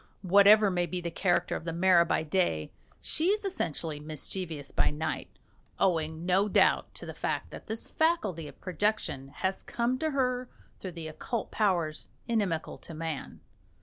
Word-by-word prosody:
Whatever 200 Hz, +2 st, +7 dB
may 175 Hz, -1 st, 0 dB
be 180 Hz, +3 st, -3 dB
the 170 Hz, -1 st, -4 dB
character 175 Hz, +1 st, +1 dB
of -, -, -5 dB
the 165 Hz, -, -3 dB
mara 170 Hz, 0 st, +4 dB
by -, -, +1 dB
day, 155 Hz, -, 0 dB, 0.3 s
she 315 Hz, -, 0 dB
is 415 Hz, +2 st, +2 dB
essentially 160 Hz, -, -2 dB
mischievous 155 Hz, 0 st, -3 dB
by -, -, +3 dB
night 155 Hz, +1 st, -3 dB, 0.5 s
owing, 160 Hz, -3 st, 0 dB
no 190 Hz, +3 st, +3 dB
doubt, -, -, +3 dB
to -, -, -7 dB
the -, -, -6 dB
fact -, -, -3 dB
that -, -, -10 dB
this 220 Hz, 0 st, -3 dB
faculty 215 Hz, -, 0 dB
of -, -, -13 dB
projection 185 Hz, -7 st, -1 dB
has 190 Hz, +7 st, -2 dB
come 245 Hz, +2 st, -1 dB
to 315 Hz, -, 0 dB
her 255 Hz, -3 st, 0 dB, 0.3 s
through 185 Hz, -2 st, -6 dB
the 165 Hz, -2 st, -6 dB
occult 215 Hz, +8 st, -4 dB
powers 175 Hz, -7 st, 0 dB, 0.2 s
inimical 200 Hz, -9 st, -1 dB
to 165 Hz, -, -10 dB
man. 160 Hz, -2 st, -5 dB
180 Hz, 165 wpm, -29 LUFS, 160-215 Hz, 0.5 s, Whatever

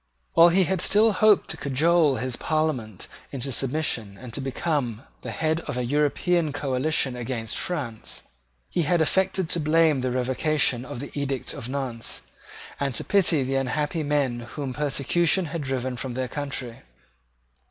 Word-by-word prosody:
While 170 Hz, +1 st, +8 dB
he 185 Hz, +2 st, +4 dB
had 185 Hz, -1 st, 0 dB
still 215 Hz, +4 st, +4 dB
hoped 210 Hz, +1 st, +4 dB
to -, -, -4 dB
cajole 150 Hz, +2 st, +3 dB
his 130 Hz, -1 st, -2 dB
Parliament 135 Hz, -, -2 dB, 0.2 s
into 135 Hz, 0 st, -3 dB
submission 125 Hz, -6 st, -1 dB
and 125 Hz, -1 st, -10 dB
to 140 Hz, -, -3 dB
become 135 Hz, -4 st, -2 dB, 0.2 s
the -, -, -6 dB
head 160 Hz, 0 st, 0 dB
of -, -, -3 dB
an 125 Hz, -1 st, -1 dB
European 150 Hz, +4 st, +1 dB
coalition 135 Hz, -1 st, 0 dB
against 115 Hz, -2 st, -3 dB
France, 130 Hz, -11 st, -4 dB, 0.4 s
he -, -, -1 dB
had 170 Hz, +2 st, +2 dB
affected 190 Hz, +2 st, +1 dB
to 170 Hz, -, +1 dB
blame 155 Hz, -2 st, +3 dB
the 130 Hz, -, 0 dB
revocation 130 Hz, +1 st, +1 dB
of 120 Hz, -1 st, -6 dB
the 140 Hz, -, -7 dB
edict 140 Hz, -2 st, -3 dB
of 115 Hz, -, -6 dB
Nantes, 130 Hz, -4 st, -3 dB, 0.6 s
and 140 Hz, -3 st, -1 dB
to -, -, -1 dB
pity 175 Hz, -7 st, +3 dB
the 130 Hz, +1 st, -2 dB
unhappy 150 Hz, +5 st, -1 dB
men 145 Hz, -5 st, 0 dB
whom 130 Hz, +3 st, -5 dB
persecution 150 Hz, +6 st, +2 dB
had 160 Hz, +1 st, -4 dB
driven 130 Hz, -2 st, -2 dB
from 125 Hz, 0 st, -5 dB
their 130 Hz, 0 st, -1 dB
country. 135 Hz, -4 st, -4 dB
140 Hz, 160 wpm, -25 LUFS, 125-160 Hz, 0.6 s, While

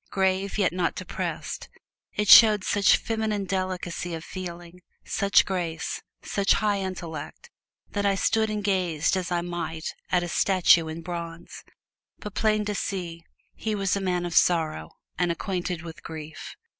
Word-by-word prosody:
Grave, 190 Hz, +1 st, 0 dB
yet 195 Hz, -5 st, +2 dB
not 180 Hz, -2 st, 0 dB
depressed, -, -, -5 dB, 0.5 s
it 210 Hz, 0 st, 0 dB
showed 210 Hz, -2 st, +9 dB
such 200 Hz, +1 st, +4 dB
feminine 220 Hz, -3 st, -2 dB
delicacy 185 Hz, -2 st, -3 dB
of 160 Hz, -, -7 dB
feeling, 175 Hz, -1 st, -8 dB, 0.2 s
such 200 Hz, 0 st, +3 dB
grace, 175 Hz, -4 st, -3 dB, 0.2 s
such 200 Hz, -1 st, +2 dB
high 210 Hz, -2 st, +1 dB
intellect, 185 Hz, -, -6 dB, 0.4 s
that 205 Hz, -, -1 dB
I 200 Hz, -1 st, +3 dB
stood 220 Hz, +2 st, +1 dB
and 210 Hz, -1 st, -3 dB
gazed 185 Hz, -4 st, +1 dB
as 185 Hz, -2 st, -2 dB
I 175 Hz, -1 st, +1 dB
might 170 Hz, -2 st, -4 dB, 0.2 s
at 180 Hz, -1 st, +3 dB
a -, -, -3 dB
statue 175 Hz, -2 st, +4 dB
in 160 Hz, +1 st, -6 dB
bronze. 170 Hz, -1 st, -7 dB, 0.5 s
But 210 Hz, -, -8 dB
plain 215 Hz, -1 st, +1 dB
to 210 Hz, -, -1 dB
see, 175 Hz, -4 st, -4 dB, 0.3 s
he 220 Hz, -1 st, -3 dB
was 195 Hz, -1 st, 0 dB
a 200 Hz, -, -2 dB
man 180 Hz, -2 st, 0 dB
of 175 Hz, -, -4 dB
sorrow 160 Hz, -, +2 dB, 0.3 s
and 175 Hz, -1 st, +2 dB
acquainted 175 Hz, -1 st, -3 dB
with 165 Hz, -1 st, -9 dB
grief. 160 Hz, -1 st, -8 dB
180 Hz, 155 wpm, -26 LUFS, 170-200 Hz, 0.5 s, showed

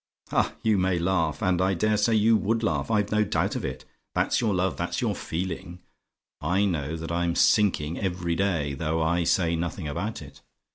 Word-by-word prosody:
Ha, -, -, +1 dB
you 110 Hz, -3 st, +3 dB
may 90 Hz, -1 st, +1 dB
laugh! 85 Hz, 0 st, 0 dB
And 90 Hz, -2 st, +2 dB
I 95 Hz, +1 st, +2 dB
dare 110 Hz, +5 st, +1 dB
say 105 Hz, +2 st, +2 dB
you 110 Hz, +1 st, +4 dB
would 110 Hz, +2 st, 0 dB
laugh! 75 Hz, -9 st, 0 dB
I've 105 Hz, -2 st, +1 dB
no 105 Hz, 0 st, +3 dB
doubt -, -, -1 dB
of -, -, -3 dB
it! 65 Hz, -1 st, -5 dB, 0.3 s
That's -, -, +1 dB
your 110 Hz, -3 st, +1 dB
love 95 Hz, -1 st, 0 dB
that's -, -, -3 dB
your -, -, 0 dB
feeling! 85 Hz, 0 st, -5 dB, 0.6 s
I 95 Hz, +7 st, +2 dB
know 80 Hz, -5 st, -1 dB
that 80 Hz, 0 st, -6 dB
I'm 85 Hz, 0 st, 0 dB
sinking 85 Hz, -7 st, +2 dB
every 90 Hz, -3 st, -1 dB
day, 85 Hz, -7 st, 0 dB
though 80 Hz, +3 st, -1 dB
I 85 Hz, +2 st, +1 dB
say 85 Hz, -1 st, +2 dB
nothing 85 Hz, 0 st, -3 dB
about 70 Hz, -, -4 dB
it. -, -, -14 dB
90 Hz, 195 wpm, -26 LUFS, 80-100 Hz, 0.6 s, you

